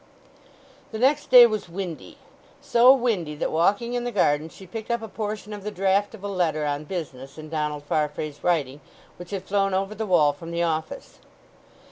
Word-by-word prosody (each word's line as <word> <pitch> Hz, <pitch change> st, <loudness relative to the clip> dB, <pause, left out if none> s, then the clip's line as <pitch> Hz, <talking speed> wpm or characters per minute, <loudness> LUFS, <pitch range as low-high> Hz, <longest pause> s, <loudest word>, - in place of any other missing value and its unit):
The 220 Hz, -, -5 dB
next 275 Hz, +5 st, +2 dB
day 250 Hz, -1 st, +10 dB
was 215 Hz, -5 st, -2 dB
windy—so 250 Hz, -, 0 dB
windy 220 Hz, -, 0 dB
that 150 Hz, -, -2 dB
walking 200 Hz, +9 st, +1 dB
in 245 Hz, 0 st, -1 dB
the 245 Hz, -, -3 dB
garden 155 Hz, -6 st, +1 dB
she 190 Hz, -, -14 dB
picked 220 Hz, +5 st, -8 dB
up 235 Hz, -1 st, -1 dB
a -, -, -5 dB
portion 210 Hz, -1 st, -5 dB
of 205 Hz, -1 st, -8 dB
the 210 Hz, -, -3 dB
draft 195 Hz, +2 st, 0 dB
of 200 Hz, -, -15 dB
a -, -, -3 dB
letter 165 Hz, -6 st, 0 dB
on 145 Hz, +1 st, -2 dB
business 140 Hz, -6 st, -7 dB
in 155 Hz, 0 st, -9 dB
Donald 150 Hz, -2 st, -3 dB
Farfrae's 150 Hz, 0 st, -3 dB
writing, 150 Hz, -5 st, 0 dB, 0.4 s
which 175 Hz, 0 st, -10 dB
had 195 Hz, -2 st, -4 dB
flown 195 Hz, -1 st, 0 dB
over 195 Hz, +2 st, -1 dB
the 215 Hz, +1 st, -4 dB
wall 155 Hz, -6 st, +4 dB
from 165 Hz, +4 st, -10 dB
the 170 Hz, 0 st, -1 dB
office. 160 Hz, -1 st, -4 dB
190 Hz, 185 wpm, -24 LUFS, 155-220 Hz, 0.4 s, day